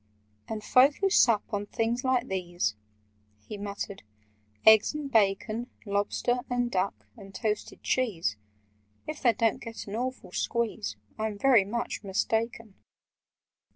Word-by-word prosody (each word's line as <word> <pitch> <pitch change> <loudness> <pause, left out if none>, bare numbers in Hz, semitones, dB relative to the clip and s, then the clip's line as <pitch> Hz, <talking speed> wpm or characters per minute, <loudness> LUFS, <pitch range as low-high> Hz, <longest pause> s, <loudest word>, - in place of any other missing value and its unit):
"And 215 -1 -5
folk 270 +6 +5
who 390 -1 0
sup 230 - +5
on 205 0 -2
things 230 +3 -1
like 260 -1 +1
these—" 175 - -2 0.7
He 215 - -5
muttered, 200 -1 -5 0.6
"eggs 220 +5 +7
and 290 -2 -4
bacon— 220 +2 +1 0.2
Lobster—and 245 +4 0
duck—and 195 +1 -4
toasted 210 -1 -3
cheese— 200 - 0 0.7
If 310 0 -6
they 240 -3 +4
don't 225 +1 +1
get 225 0 -7
an 200 - -6
awful 255 -4 -4
squeeze, 190 - -2 0.2
I'm 215 -1 -2
very 235 -3 +5
much 235 +3 -3
mistaken! 220 +2 -1
220 Hz, 120 wpm, -28 LUFS, 200-245 Hz, 0.7 s, eggs